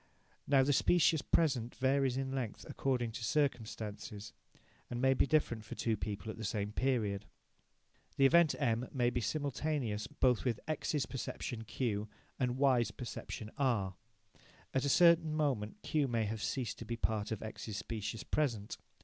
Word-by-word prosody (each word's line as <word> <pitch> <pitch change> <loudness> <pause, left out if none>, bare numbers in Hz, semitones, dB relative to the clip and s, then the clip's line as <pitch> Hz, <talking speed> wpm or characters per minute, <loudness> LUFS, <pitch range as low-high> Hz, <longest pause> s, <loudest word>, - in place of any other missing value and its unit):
Now 135 -2 +5
the 145 +2 +3
"specious 160 +1 +4
present" 130 -7 +1
varies 135 -1 +2
in 135 0 -2
length 125 -6 -4
according 125 -4 -1
to 115 - -6
circumstances, 110 -5 -2 0.6
and 120 - -3
may 135 +1 +4
be 135 - +2
different 130 -8 +1
for 105 - -8
two 115 -2 0
people 105 +3 -4
at - - -10
the 110 - -6
same 105 0 -2
period. 105 -5 0 0.9
The 135 - +4
event 170 +2 +6
M 120 -3 0
may 120 -3 +1
be 120 - -1
simultaneous 135 -5 -1
both 130 -5 +2
with 120 -4 0
X's 155 -3 -1
perception 120 -2 -5
Q 110 -3 -2 0.3
and 125 -1 0
Y's 130 -5 +4
perception 110 -1 -6
R. 115 -9 +1 0.8
At 130 +1 +1
a - - +1
certain 165 -1 +5
moment 135 - 0
Q 150 -3 +1
may 115 -3 0
have 110 +1 -3
ceased 120 -2 -2
to 115 - -6
be 115 +1 -3
part 110 -2 -1
of 110 - -3
X's 110 -1 -6
specious 110 0 -4
present. 115 -9 -1
120 Hz, 160 wpm, -34 LUFS, 110-140 Hz, 0.9 s, event